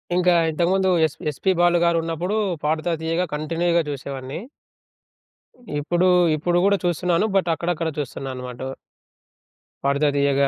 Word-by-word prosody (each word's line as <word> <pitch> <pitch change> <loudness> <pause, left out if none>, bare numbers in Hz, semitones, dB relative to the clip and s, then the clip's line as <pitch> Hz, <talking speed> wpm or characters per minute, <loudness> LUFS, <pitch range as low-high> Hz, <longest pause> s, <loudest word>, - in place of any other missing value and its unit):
ఇంకా 180 0 +4 0.2
ఇంతకు 170 +2 0
ముందు 190 -1 +2 0.2
ఎస్ 155 - -3 0.2
ఎస్‌పీ 190 +7 0
బాలు 175 0 +4
గారున్నప్పుడు 170 +3 0 0.3
'పాడుతా 155 +3 0
తీయగా' 165 +3 -1
కంటిన్యూగా 170 +3 +1
జూసేవాడిని. 135 -1 -5 1.4
ఇప్పుడు 175 +5 +1 0.3
ఇప్పుడు 175 +3 0
గూడా 200 0 +4
చూస్తున్నాను 175 +2 +1
బట్ 180 -3 +1
అక్కడక్కడ 170 0 -2
చూస్తున్నా 135 -1 -5
అనమాట. 125 -1 -7
ఉ - - -9 1.1
పాడుతా 140 +2 +2
తీయగా. 140 0 +3
165 Hz, 125 wpm, -22 LUFS, 145-175 Hz, 1.4 s, ఇంకా